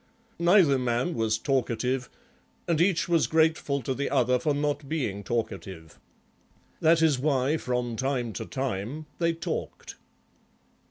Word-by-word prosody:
Neither 170 -6 +5
man 125 +7 0
was 110 -3 0
talkative 125 0 -1 0.6
and 165 -2 +2
each 180 -2 +2
was 170 -2 +2
grateful 160 -4 +1
to 130 - -1
the 140 +2 -2
other 125 0 +2
for 150 - 0
not 145 -1 -2
being 110 -11 -2
talkative. 95 -7 -5 0.8
That 165 0 +4
is 150 -5 +3
why 140 +1 +1
from 125 -4 -2
time 130 -3 -1
to - - -5
time 130 +3 -4
they 170 -1 +2
talked. 165 - -5
135 Hz, 130 wpm, -27 LUFS, 120-160 Hz, 0.8 s, Neither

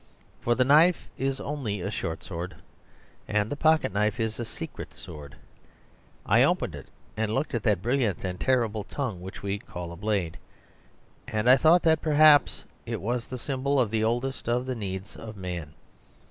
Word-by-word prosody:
For 120 - +1
the 130 - +4
knife 160 +6 +5
is 135 0 -1
only 130 -9 -3
a 100 +3 -3
short 80 -5 -4
sword; 90 0 -6 0.7
and 105 0 0
the - - -1
pocket 155 -7 +3
knife 105 0 +1
is 110 0 -2
a 120 - -2
secret - - -8
sword. 75 -2 -10 0.9
I - - +4
opened - - +2
it - - -9 0.3
and 110 0 -1
looked 135 +4 -1
at 115 - 0
that 100 -4 +1
brilliant 120 - 0
and 90 0 -4
terrible 115 -5 +1
tongue 110 -6 -4
which 95 +2 -9
we 100 0 -2
call 85 -3 -7
a - - -7
blade; 100 -4 -2 0.9
and 110 +2 -1
I 130 - +9
thought 165 +6 +5
that 160 -1 +3
perhaps 150 -2 +5 0.2
it - - -4
was 120 +3 -2
the 130 - -5
symbol 135 +2 0
of 115 -5 +2
the 110 -1 +1
oldest 120 +2 -1
of 125 +1 +1
the 130 - -2
needs 100 -3 -5
of 110 -2 -9
man. 85 -5 -6
110 Hz, 180 wpm, -27 LUFS, 100-135 Hz, 0.9 s, I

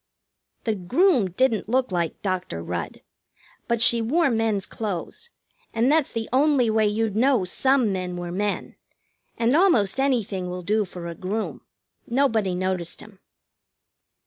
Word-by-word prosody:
The 225 - 0
groom 235 - +2
didn't 220 +2 0
look 255 -2 +1
like 170 -3 -2
Dr. 180 - -3
Rudd. 85 -1 -5 0.7
But 235 -1 +2
she 235 -1 +5
wore 285 +6 +2
men's 220 -4 0
clothes, 220 - -5 0.5
and 235 +4 +3
that's 310 -2 +2
the 230 -2 -3
only 265 -4 +3
way 220 -1 +3
you'd 210 0 -1
know 245 -3 +3
some 260 +4 +2
men 180 -1 -4
were 175 0 -5
men, 205 +3 -3 0.6
and 235 +3 +2
almost 270 - +3
anything 215 -9 0
will 180 0 -5
do 210 +4 +1
for 180 -2 -9
a 170 - -5
groom. 195 +6 -4 0.5
Nobody 225 -7 +1
noticed 185 -2 -2
him. 205 -3 -13
220 Hz, 145 wpm, -24 LUFS, 185-255 Hz, 0.7 s, she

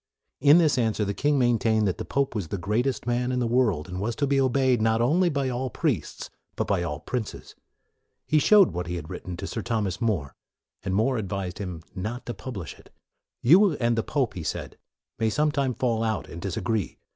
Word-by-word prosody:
In 145 +3 +7
this 155 -7 +3
answer 110 -2 +1
the 100 - -2
king 145 +6 +1
maintained 115 -4 +2
that 95 - -2
the - - -4
pope 140 0 0
was 100 -7 -3
the 100 - -3
greatest 110 +9 -1
man 125 +1 0
in 125 - -1
the 125 - +1
world, 115 -10 +1
and 90 +1 -5
was 115 +3 -2
to 145 - 0
be 140 0 +2
obeyed, 130 -2 +2
not 110 0 +2
only 165 +10 +3
by 140 -3 -1
all 130 +1 -2
priests, - - -2 0.2
but - - -1
by 95 -3 0
all 75 -4 -3
princes. 120 +1 -5 0.7
He 155 - +3
showed 200 +4 +6
what 90 0 -4
he 90 - -3
had 80 -2 -7
written 90 -2 -6
to - - -5
Sir 115 - -4
Thomas 105 -3 -2
More, 95 -12 -1 0.5
and 95 -1 -2
More 125 +5 +2
advised 95 -3 -4
him 90 -5 -5
not 110 +7 -5
to 120 - -4
publish 100 - -7
it. - - -19 0.3
" - - -62
You 180 - +6
and 120 -4 +1
the 115 - +1
pope,' 135 0 -1
1 - - -11
he - - -5
said, - - -4 0.2
" - - -50
may 110 - +2
some 150 +6 +1
time 135 -4 0
fall 115 -3 0
out, 110 -1 -1
and 85 - -9
disagree. 100 +2 -2
115 Hz, 225 wpm, -26 LUFS, 100-130 Hz, 0.7 s, In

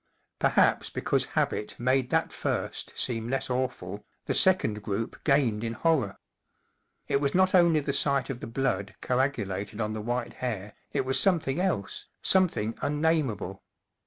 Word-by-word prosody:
Perhaps - - +3
because - - 0
habit 105 - 0
made 130 +1 +1
that - - +1
first - - -3
seem 115 -2 -1
less 135 0 -1
awful, 105 -6 -3 0.2
the - - 0
second 140 - +3
group 105 +2 -4
gained 130 -7 +2
in 115 0 -2
horror. 130 - +1 0.9
It 140 - +1
was 140 +2 0
not 185 0 +4
only 170 -4 +5
the 140 0 -2
sight 140 -2 +1
of 125 - -6
the - - -6
blood 115 -6 -1
coagu¬ 130 -3 +1
lated 100 +3 -5
on 110 -1 -1
the 110 - -4
white 120 +2 -2
hair, 105 -5 -3 0.2
it - - 0
was 130 0 +2
something 165 -6 +2
else, 180 - -2 0.2
something 165 - +3
unnamable. 145 - 0
125 Hz, 155 wpm, -28 LUFS, 105-145 Hz, 0.9 s, only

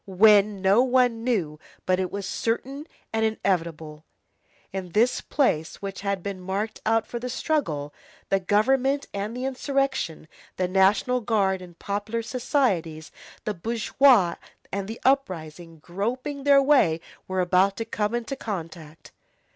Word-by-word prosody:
When? 200 0 +4
No 195 +5 +5
one 250 -3 +2
knew, 180 -12 -1 0.3
but 185 0 +2
it 185 -1 -2
was 200 -1 -4
certain 270 +9 -3 0.3
and 225 0 +1
inevitable. 165 -8 -2 0.7
In 185 -3 -5
this 235 +4 +2
place 160 - 0
which 195 -1 -6
had 200 -2 -2
been 200 -2 -4
marked 195 +4 -3
out 225 0 +2
for 240 - -5
the 250 +1 -5
struggle, 165 - -2 0.4
the 195 - +3
Government 265 +9 +2
and 205 +4 -4
the 255 - -3
insurrection, 270 - -1 0.3
the 185 - 0
National 195 +7 +3
Guard, 195 -5 +1
and 175 -2 -12
popular 205 +3 -3
societies, 200 - -1 0.3
the 210 - -1
bourgeois 220 0 +3 0.3
and 195 0 -3
the 225 +2 -7
uprising, 175 - -1
groping 245 - -4
their 280 -1 +6
way, 265 - +4 0.3
were 185 0 -2
about 185 +2 +3
to 225 - -3
come 215 0 -1
into 240 +3 -3
contact. 165 - -7
205 Hz, 140 wpm, -25 LUFS, 180-245 Hz, 0.7 s, their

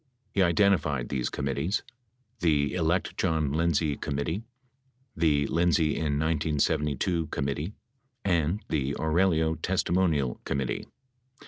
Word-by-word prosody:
He 100 - +2
identified 85 - +2
these 65 -3 -1
committees: 70 +7 -1 0.6
"The 75 -5 +2
Elect 90 +1 0
John 80 -6 +1
Lindsay 80 -1 +1
Committee," 75 +7 -2 0.7
the 75 -4 +2
"Lindsay 85 0 +2
in 75 -3 0
1972 80 +1 0
Commit 70 -1 -2
tee," 80 +8 -4 0.5
and 85 +2 +1
the 70 -2 -1
"Aurelio 80 0 +2
Testimonial 80 -5 0
Committee." 65 -3 -2
80 Hz, 105 wpm, -28 LUFS, 70-85 Hz, 0.7 s, He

